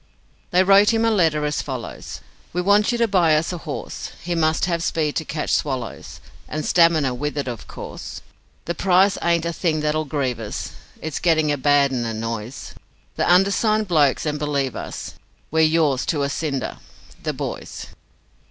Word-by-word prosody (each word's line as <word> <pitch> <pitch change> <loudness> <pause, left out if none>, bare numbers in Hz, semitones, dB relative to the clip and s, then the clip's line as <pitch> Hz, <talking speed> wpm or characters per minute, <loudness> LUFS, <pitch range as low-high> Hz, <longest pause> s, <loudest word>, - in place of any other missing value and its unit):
They 180 +1 +4
wrote 200 +2 +6
him 225 0 +2
a 225 - +3
letter 160 -7 +2
as 150 0 -1
follows: 130 -4 -6 0.3
'We 180 - 0
want 205 +3 +4
you 240 - 0
to 235 -1 +2
buy 175 -6 +4
us 160 +4 0
a 175 - -5
horse; 155 -3 -6
He 175 +1 -2
must 160 -1 +2
have 170 -2 0
the 165 - -1
speed 155 -2 -1
to 160 - -2
catch 150 0 -3
swallows, 130 -5 -3 0.3
And 155 0 -4
stamina 165 -6 +4
with 150 +4 -3
it 140 - -2
of 120 -3 -6
course. - - -8 0.4
The 170 - -1
price 190 +3 +3
ain't 170 -1 +1
a 170 - -1
thing 160 -3 0
that'll 155 +1 0
grieve 135 -5 -2
us, 110 -2 -5 0.3
It's 160 -3 -3
getting 160 -3 +2
a - - +2
bad 145 0 +3
'un 125 -2 -1
annoys 115 +2 -5 0.4
The - - +2
undersigned 205 +3 +3
blokes, 150 -6 +3
and 150 -1 -1
believe 140 -3 -1
us, - - -6 0.4
We're 160 - +1
yours 155 -4 +3
to 150 -5 0
a 140 - 0
cinder, 140 -3 -3 0.4
'the - - -2
boys'.' - - -6
155 Hz, 180 wpm, -22 LUFS, 140-175 Hz, 0.4 s, wrote